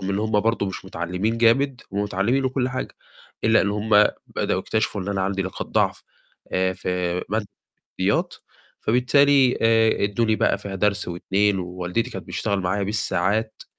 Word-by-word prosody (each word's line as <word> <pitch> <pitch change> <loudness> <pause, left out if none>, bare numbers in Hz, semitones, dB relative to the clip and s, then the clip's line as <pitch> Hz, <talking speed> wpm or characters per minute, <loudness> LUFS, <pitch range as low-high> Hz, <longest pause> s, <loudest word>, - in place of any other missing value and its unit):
رغم 95 - -2
إن 100 - 0
هُم 110 -1 +1
برضه 115 -2 0
مش 95 - -6
متعلمين 95 +6 -2
جامد، 125 +3 +3
هُم 100 - -1
متعلمين 105 +7 0
وكلّ 130 -1 0
حاجة، 130 0 -5 0.5
إلا 110 0 +5
إن 100 - 0
همُ 105 0 +4 0.2
بدأوا - - -1
يكتشفوا 110 -2 -1
إن 100 - -6
أنا 100 -1 -1
عندي 95 0 -1
نقاط 95 - -5
ضعف - - 0 0.5
آآ 95 0 +1
في 90 - -7 0.4
مادة 105 0 -1 0.5
الرياضيات، - - +1 0.5
فبالتالي 130 +2 +4
آآ 115 -2 +3
إدوني 110 +2 +1
بقى - - +1
فيها 100 -1 -7
درس 105 +1 0
و2 95 +3 0
ووالدتي 90 +4 -3
كانت - - -8
بتشتغل 100 -1 -1
معايا 100 +3 -1
بالساعات 105 +1 -1
105 Hz, 160 wpm, -23 LUFS, 95-115 Hz, 0.5 s, إلا